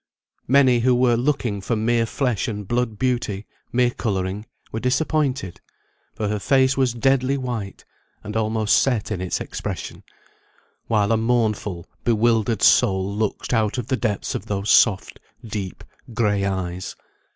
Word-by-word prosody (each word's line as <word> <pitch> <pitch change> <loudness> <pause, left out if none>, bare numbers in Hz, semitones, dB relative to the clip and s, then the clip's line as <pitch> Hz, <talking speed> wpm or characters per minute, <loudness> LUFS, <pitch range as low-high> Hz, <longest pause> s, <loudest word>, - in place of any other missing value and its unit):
Many 130 -2 +5
who 125 +1 +3
were 125 -1 +3
looking 120 -5 -1
for 115 +4 -1
mere 115 +1 +1
flesh 125 -4 -1
and 105 -3 -5
blood 120 -2 -1
beauty, 120 -4 -1 0.3
mere 125 0 +2
colouring, 100 -2 -3 0.2
were 110 - -3
disappointed; 130 - -1 0.5
for 105 - -2
her 105 0 -1
face 130 +3 +3
was 130 -2 +2
deadly 135 +2 +2
white, 120 -7 -5 0.4
and 105 0 -7
almost 110 -1 +2
set 120 -6 0
in 95 -4 -2
its 95 - -2
expression, - - -6 0.9
while 105 -2 +2
a 115 - +3
mournful 110 -6 0 0.2
bewildered 115 -2 +2
soul 95 +1 +4
looked 110 +3 -2
out 110 0 +1
of 125 -2 -4
the 130 - +2
depths 110 -5 -2
of 100 - -5
those 100 0 -1
soft, 100 -4 +3 0.3
deep, 105 -4 -5 0.3
gray 105 -4 +1
eyes. 95 -2 -3
110 Hz, 145 wpm, -22 LUFS, 100-125 Hz, 0.9 s, Many